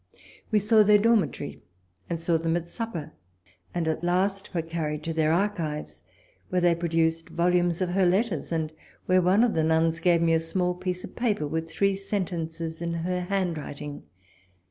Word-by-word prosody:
We 215 - +3
saw 215 +2 +5
their 210 0 +6
dormitory, 195 - +1 0.5
and 170 - -2
saw 165 0 +1
them 165 +1 +1
at 170 0 -5
sup 230 +5 -5
per; 155 -2 -5 0.6
and 170 -2 -2
at 160 +1 -1
last 195 +3 0
were 170 -3 -1
carried 160 -2 -3
to 165 - -3
their 155 -1 +2
archives, 160 - -1 0.5
where 185 - +1
they 175 -1 +4
produced 165 -1 0
volumes 175 0 +1
of 185 - +1
her 185 0 +3
letters, 190 - 0
and 160 -1 -1 0.3
where 185 0 +4
one 190 +5 +4
of 245 - +2
the 160 - +1
nuns 160 +1 +2
gave 170 -2 +3
me 165 0 +3
a 165 - +4
small 180 +2 -1
piece 180 0 -4
of - - -9
paper 215 -10 0
with 160 +2 -3
three 195 +3 +1
sentences 165 -5 -4
in 170 0 -2
her 180 +2 -1
handwriting. 165 -6 -3
170 Hz, 180 wpm, -26 LUFS, 160-185 Hz, 0.6 s, their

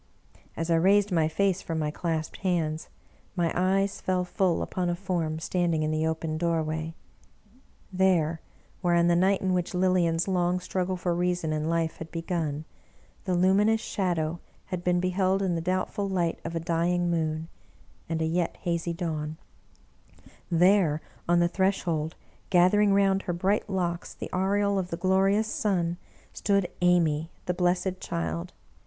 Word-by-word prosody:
As 165 +1 -2
I 165 - +4
raised 200 +4 +4
my 165 -3 +3
face 190 +3 +1
from 165 - -4
my 150 -1 -1
clasped 160 -1 -3
hands, 165 -4 -1 0.5
my 170 -3 +1
eyes 195 +2 +1
fell 185 -1 0
full 180 -1 +1
upon 180 -1 -2
a 175 - 0
form 175 -4 -2
standing 165 -1 0
in 155 - 0
the 155 +1 0
open 160 -1 -2
doorway. 160 -1 -1 1.0
There, 175 -4 +2 0.4
where 175 -2 +2
on 170 0 +4
the 175 0 +4
night 190 +3 +2
in 185 -1 +1
.which 180 0 -1
Lilian's 180 -2 +2
long 180 -1 +1
struggle 185 0 -2
for 175 0 -1
reason 175 -2 0
and 155 0 -1
Ufe 165 -1 0
had 160 - -8
begun, 165 -3 -3 0.6
the 185 -2 0
Luminous 200 +5 +4
Shadow 170 -6 -1 0.3
had 175 -1 -3
been 180 0 +2
beheld 185 +1 +1
in 185 -2 +1
the 165 - -1
doubtful 185 +3 -1
light 175 -3 0
of 165 0 -5
a - - 0
dying 175 +1 0
moon 160 -1 -1 0.6
and 160 -1 -1
a - - +1
yet 170 +1 -1
hazy 170 -1 -1
dawn; 155 -3 -3 1.1
there, 175 -3 +4 0.3
on 175 0 +5
the 170 - +4
threshold, 170 -4 0 0.3
gathering 195 +3 +4
round 195 -1 +3
her 175 - -3
bright 195 +5 0
locks 175 -3 -2
the - - -7
aureole 200 +2 +1
of 180 -1 -3
the 170 - -3
glorious 195 +4 +2
sun, 175 -6 0 0.4
stood 200 -3 +1
Amy, 165 -3 +3 0.2
the 180 - 0
blessed 180 +1 0
child 85 0 -3
175 Hz, 160 wpm, -27 LUFS, 165-185 Hz, 1.1 s, on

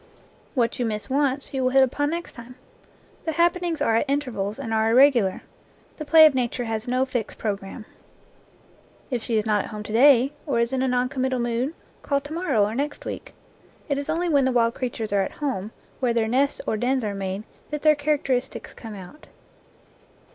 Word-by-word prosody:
What 240 -2 0
you 245 - +1
miss 215 +4 -4
once, 280 0 0
you 265 - -1
will 255 - +2
hit 270 +1 +5
upon 290 +3 0
next 340 +2 -4
time. 235 +1 -11 0.7
The 320 - -1
happenings 345 0 +1
are 225 - +3
at 270 - -1
intervals 245 -8 -2
and 230 -5 -4
are 220 0 +2
irregular. 240 -5 +4 0.5
The 305 - -6
play 315 +1 +8
of 305 - +5
Nature 245 -1 -1
has 225 0 -3
no 255 +1 +1
fixed 245 -4 -4
programme. 205 +1 -4 1.3
If 245 -3 -1
she 225 0 -1
is 215 - 0
not 210 -2 +1
at - - -8
home 210 -1 -6
to 210 - -7
day, 265 +2 +5
or 280 - 0
is 235 +2 +1
in 260 - 0
a 265 - +1
non 250 0 +1
committal 260 0 -1
mood, 240 +5 -1 0.3
call 280 -1 0
to 290 +2 -8
morrow, 305 - +1
or 210 - -3
next 285 +4 -3
week. - - -7 0.5
It 280 -1 0
is 285 - -5
only 335 +3 0
when 285 -5 +3
the 260 - +2
wild 230 -2 +2
creatures 230 -5 -4
are 200 - +3
at 190 - -3
home, 255 -9 -3 0.3
where 245 -3 +1
their 225 -1 +2
nests 270 +5 +1
or 220 - -1
dens 255 +3 0
are 210 -1 -2
made, 195 +1 -4 0.3
that 300 -1 -5
their 305 -1 +6
characteristics 285 -3 -2
come 220 -3 -9
out. 195 +10 -12
255 Hz, 205 wpm, -24 LUFS, 225-285 Hz, 1.3 s, play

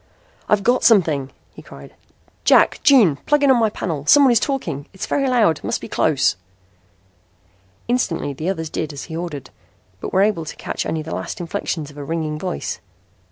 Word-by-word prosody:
"I've 210 -1 +2
got 245 +3 +2
something," 160 - +3 0.2
he - - -12
cried. - - -13 0.5
"Jack. - - +4
June. 235 - +5
Plug 295 -1 +3
in 280 - +5
on 250 - +4
my 220 -1 +3
panel. 160 -8 -4
Someone 280 -3 +6
is 235 - +4
talking. 235 - -3
It's 190 - -5
very 275 -2 0
loud. 215 -11 +2
Must - - -2
be - - -8
close." 140 -10 +1 1.5
Instantly 200 - -1
the 155 +6 -4
others 160 -5 -4
did 155 -1 -3
as 140 - -7
he 160 - -8
ordered, 165 -5 -6 0.5
but - - -6
were 190 - +3
able 200 -6 0
to - - -7
catch - - -4
only 160 -1 -2
the 160 - -6
last - - -5
inflections 165 -3 -4
of 145 - -17
a - - -5
ringing 155 0 -3
voice. 185 +1 -4
170 Hz, 185 wpm, -20 LUFS, 155-235 Hz, 1.5 s, Someone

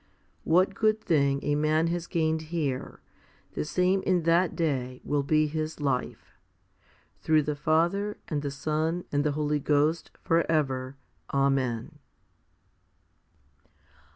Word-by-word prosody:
What 185 +4 +3
good 215 +1 +2
thing 140 -7 +1
a 145 - 0
man 155 +2 +2
has 170 0 -3
gained 160 -1 -1
here, 145 -6 -3 0.5
the - - -2
same 180 +5 +1
in 180 -3 +1
that 170 +2 +2
day 130 -6 -2
will 145 -1 0
be 155 +2 +2
his 155 +1 -4
life, 135 -4 -3 0.8
through 155 -1 +3
the 150 0 -2
Father, 170 +8 +1
and 150 -3 -2
the 145 - -3
Son, 155 +5 -2
and 145 0 +1
the 150 -1 0
Holy 150 0 0
Ghost, 150 +3 +1
for 165 0 +3
ever. 135 -4 -1 0.3
Amen. 135 -4 0
155 Hz, 125 wpm, -27 LUFS, 140-165 Hz, 0.8 s, What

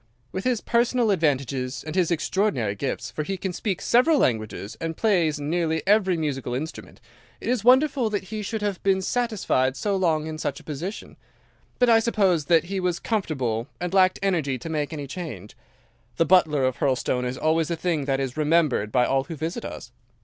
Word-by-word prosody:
With 190 - -5
his 250 -3 +1
personal 235 -1 +2
advantages 135 -6 -1
and 155 - -5
his 180 -2 +2
extraordinary 170 - 0
gifts—for 135 +7 -4
he 190 +6 -3
can 190 -1 -4
speak 195 0 -3
several 290 +6 +4
languages 110 - -1
and 165 -1 -3
play 185 -8 +2
nearly 160 +1 -1
every 195 -3 +3
musical 135 -6 -2
instrument—it 155 +6 -9
is 245 -3 0
wonderful 260 -1 +4
that 205 -2 -2
he 215 - -3
should 210 +1 -4
have 200 -3 -2
been 190 -1 +2
satisfied 195 - 0
so 200 +6 0
long 165 -5 +1
in 155 0 -6
such 140 -3 -3
a - - -16
position, 165 +8 -6 0.6
but 245 - +3
I 225 -1 +6
suppose 195 -9 +1
that 165 0 +4
he 190 +3 -3
was 180 -2 0
comfortable, 135 - -2
and 180 0 -3
lacked 185 -1 +4
energy 160 -9 0
to 125 - -8
make 150 -2 -2
any 145 -3 -5
change. 135 - -7 0.6
The 165 - +3
butler 155 -5 +4
of 130 -2 -1
Hurlstone 130 -2 0
is 125 +1 -3
always 160 +2 +1
a 170 - 0
thing 165 -4 -1
that 135 -1 0
is 135 -2 -3
remembered 150 -8 +2
by 125 +1 +3
all 135 0 +1
who 165 - -6
visit 165 +9 -4
us. 115 - -8
165 Hz, 185 wpm, -24 LUFS, 140-195 Hz, 0.6 s, I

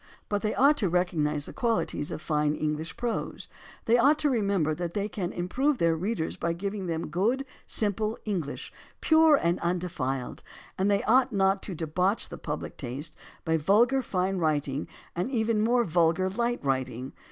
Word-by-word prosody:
But 205 -1 0
they 215 - -1
ought 285 +3 +5
to 200 -8 +1
recognize 155 -4 0
the - - -7
qualities 230 -10 -1
of 155 - -6
fine 150 -2 +1
English 155 +1 -3
prose; 240 -2 -3 0.4
they 235 +2 +4
ought 285 +5 +5
to 300 -2 +1
re 235 -4 +1
member 190 -6 +1
that 170 +1 -4
they 205 0 0
can 190 -4 -4
improve 260 +11 0
their 165 -4 +2
readers 180 0 -2
by 170 - -1
giving 195 +2 -4
them 165 -1 -3
good; 235 +10 0 0.2
simple 215 +1 +1
English; 175 -9 -4 0.3
pure 320 -1 +5
and 170 -9 +1
undefiled; 165 -8 -2 0.3
and 190 +2 +1
they 200 +2 +2
ought 260 0 +4
not 195 -1 +2
to 190 - -5
debauch 180 +6 0
the - - -8
public - - -5
taste 140 +5 -4 0.3
by 160 -1 +2
vulgar 230 - +3
fine 190 -4 -1
writing 150 -3 0 0.3
and 180 +7 -1
even 225 -4 +1
more 240 +2 +3
vulgar 175 +1 +2
light 235 -3 -1
writing. 130 -1 -2
185 Hz, 175 wpm, -28 LUFS, 160-225 Hz, 0.4 s, ought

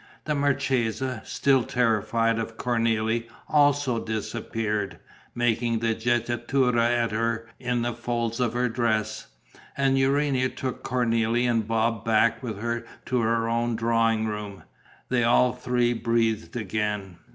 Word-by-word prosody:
The 150 - 0
marchesa, 130 -4 0
still 135 -2 +2
terrified 115 -1 +1
of 115 0 -5
Cornélie, 115 -1 0 0.2
also 145 -5 +2
disappeared, 110 -1 -3 0.4
making 120 -1 +1
the 115 0 +1
jettatura 120 +1 +1
at 120 -1 +1
her 115 +1 -1
in 125 -1 -1
the 120 0 -1
folds 120 0 -2
of 120 -2 +1
her 125 +1 +1
dress. 110 -2 -1 0.5
And 135 -1 +2
Urania 135 -1 +2
took 130 -1 -5
Cornélie 120 -1 +1
and 115 -3 +1
Bob 115 -1 0
back 115 +1 +2
with 115 -6 -5
her 120 0 -2 0.2
to 125 - 0
her 115 0 +1
own 115 0 0
drawing 115 -1 +2
room. 105 -2 -5 0.5
They 125 -2 +2
all 120 +1 +4
three 125 -1 0
breathed 115 0 0
again. 105 -5 -3
115 Hz, 130 wpm, -26 LUFS, 110-125 Hz, 0.5 s, all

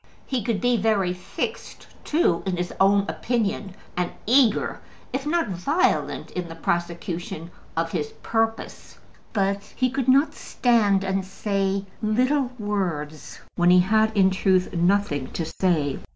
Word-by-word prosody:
He 260 -3 -1
could 215 -1 0
be 245 -1 +2
very 200 -4 +1
fixed 180 - -5 0.2
too 300 - +2
in 185 -2 -1
his 175 0 -3
own 200 +1 +5
opinion, 210 -5 -2 0.2
and 180 -1 0 0.2
eager, 240 -1 +3 0.3
if 270 +2 -2
not 335 -5 +1
violent, 280 - 0
in 180 -1 -4
the 165 - -8
prosecution 170 0 -3 0.3
of 165 0 0
his 150 - -1 0.2
purpose. 225 0 -2 0.3
But 200 -1 0
he 255 -1 +1
could 265 -1 -2
not 275 +4 +4
stand 210 -6 +2
and 195 0 -1
say 195 0 -1 0.2
little 250 +5 +2
words, 175 -8 -3
when 175 0 +3
he 180 0 +7
had 215 +3 +2
in 190 -1 +5
truth 185 -1 +2
nothing 175 -6 +1
to 165 - -2
say. 160 -4 0
195 Hz, 140 wpm, -24 LUFS, 175-225 Hz, 0.3 s, he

